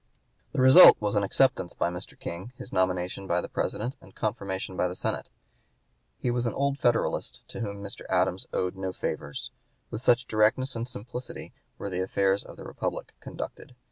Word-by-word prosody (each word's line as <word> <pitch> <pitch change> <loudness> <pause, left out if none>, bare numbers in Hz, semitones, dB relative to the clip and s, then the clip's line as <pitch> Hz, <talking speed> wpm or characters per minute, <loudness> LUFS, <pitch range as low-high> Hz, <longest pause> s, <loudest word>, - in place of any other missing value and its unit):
The - - +1
result 130 +8 +10
was 105 0 -1
an 105 - +4
acceptance 100 -2 +2
by 85 - 0
Mr. 90 +1 -8
King, 95 +9 -6
his - - -9
nomination 95 +1 0
by 85 0 +2
the - - -4
President, 120 +5 -2
and 95 - -17
confirmation 95 -3 -3
by 90 - +1
the 90 - -5
Senate. - - -3 0.9
He 125 - -1
was 120 0 0
an - - -2
old 140 0 0
Federalist, 120 -2 0
to - - -7
whom 100 -3 -4
Mr. 100 - -7
Adams - - +1
owed 90 0 -1
no 95 -1 -3
favors. 75 -4 -4 0.4
With 110 - -4
such 125 0 +4
directness 115 +4 +2
and 115 +1 -3
simplicity 125 0 -7 0.2
were 100 - -5
the 90 0 -1
affairs 95 +1 +1
of - - -12
the - - -9
Republic - - -4
conducted. 125 - -8
100 Hz, 180 wpm, -28 LUFS, 95-120 Hz, 0.9 s, result